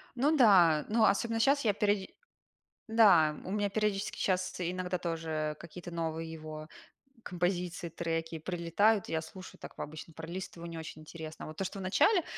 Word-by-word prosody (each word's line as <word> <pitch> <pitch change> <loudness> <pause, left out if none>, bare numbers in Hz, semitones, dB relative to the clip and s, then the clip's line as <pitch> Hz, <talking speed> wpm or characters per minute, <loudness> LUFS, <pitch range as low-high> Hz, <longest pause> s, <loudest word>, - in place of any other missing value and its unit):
Ну 290 +6 +3
да, 180 - +6
ну, 220 0 +3
особенно 225 +3 +2
щас 280 +4 +3
я 205 - +4
периоди 205 -1 0 0.8
Да, 185 -9 +5
у - - -6
меня 205 0 0
периодически 210 -1 -1
щас 185 -1 0
иногда 180 +1 -2
тоже 160 -3 -2
какие-то 175 +1 -9
новые 165 -1 -3
его 155 -1 -8 0.6
композиции, 175 -1 -2
треки 165 0 -3
прилетают, 180 +5 +1
я 160 -1 0
слушаю 185 +3 -11
так - - -10
по - - -4
обычно 155 +2 -9
пролистываю, 170 +1 -7
не 165 - -7
очень 155 -1 -8
интересно. 160 0 -9
А - - -8
вот 155 - -10
то, 195 - -2
что 195 - -5
вначале, 310 - +3
175 Hz, 165 wpm, -31 LUFS, 160-200 Hz, 0.8 s, да